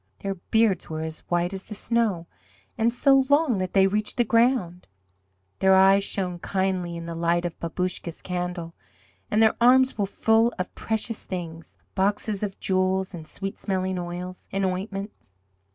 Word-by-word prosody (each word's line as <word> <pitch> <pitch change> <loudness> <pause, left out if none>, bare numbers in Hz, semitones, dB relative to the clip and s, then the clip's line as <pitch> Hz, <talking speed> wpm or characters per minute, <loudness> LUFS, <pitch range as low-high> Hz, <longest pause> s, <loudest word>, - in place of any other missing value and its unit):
Their 195 0 -3
beards 195 0 +1
were 160 0 -3
as 160 -1 -5
white 175 +1 0
as 190 -1 -6
the 210 - -8
snow, 215 -6 0 0.5
and 230 +1 +2
so 270 +2 +4
long 285 -7 +3
that 185 -1 -3
they 195 -1 +5
reached 210 +4 -1
the 240 - +4
ground. 230 -7 +1 0.7
Their 190 0 +5
eyes 195 +1 +6
shone 180 -3 -2
kindly 185 -2 -1
in 170 - -7
the 170 - -5
light 170 +1 0
of 170 - -5
Babouscka's 170 0 -3
candle, 175 -2 -4 0.6
and 215 +1 +3
their 220 - +4
arms 260 0 +5
were 200 - +1
full 225 +3 +2
of 180 -1 -4
precious 220 0 -3
things 165 -3 -7 0.2
boxes 200 +1 0
of 200 -2 -4
jewels, 190 0 0
and 160 -3 -8
sweet 195 +3 -6
smelling 185 -1 -2
oils, 180 +1 -7
and 195 0 0
ointments. 195 - -5
190 Hz, 165 wpm, -25 LUFS, 175-215 Hz, 0.7 s, eyes